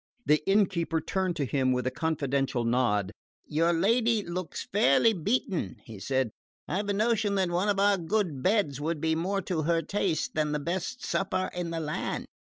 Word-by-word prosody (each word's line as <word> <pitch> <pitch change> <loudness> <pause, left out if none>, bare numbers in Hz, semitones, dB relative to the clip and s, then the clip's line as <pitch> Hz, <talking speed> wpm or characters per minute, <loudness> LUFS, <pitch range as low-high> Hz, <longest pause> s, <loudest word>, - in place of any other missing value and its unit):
The 150 0 +4
innkeeper 185 -5 +2
turned 185 +2 -1
to 145 - -1
him 130 0 +1
with 125 0 -1
a 130 - 0
confidential 140 -6 -1
nod. 115 -5 +1 0.3
"Your 165 +3 +2
lady 225 +5 +2
looks 175 -1 -5
fairly 205 - +4
beaten," 195 - -1
he 110 -3 -10
said. 130 +1 0 0.4
"I've 200 +3 -2
a - - +2
notion 215 -1 +1
that 190 -3 +1
one 180 +4 +1
of 200 - +1
my 200 0 +4
good 175 -5 -1
beds 185 - +1
would 160 +1 -1
be 160 +1 +1
more 190 +5 -1
to 170 -3 -1
her 165 +1 +1
taste 185 -2 -1
than 150 -1 0
the 150 - 0
best 185 - -3
supper 185 -1 -1
in 175 -1 -3
the 165 0 -3
land. 155 -1 -3
170 Hz, 180 wpm, -28 LUFS, 150-195 Hz, 0.4 s, The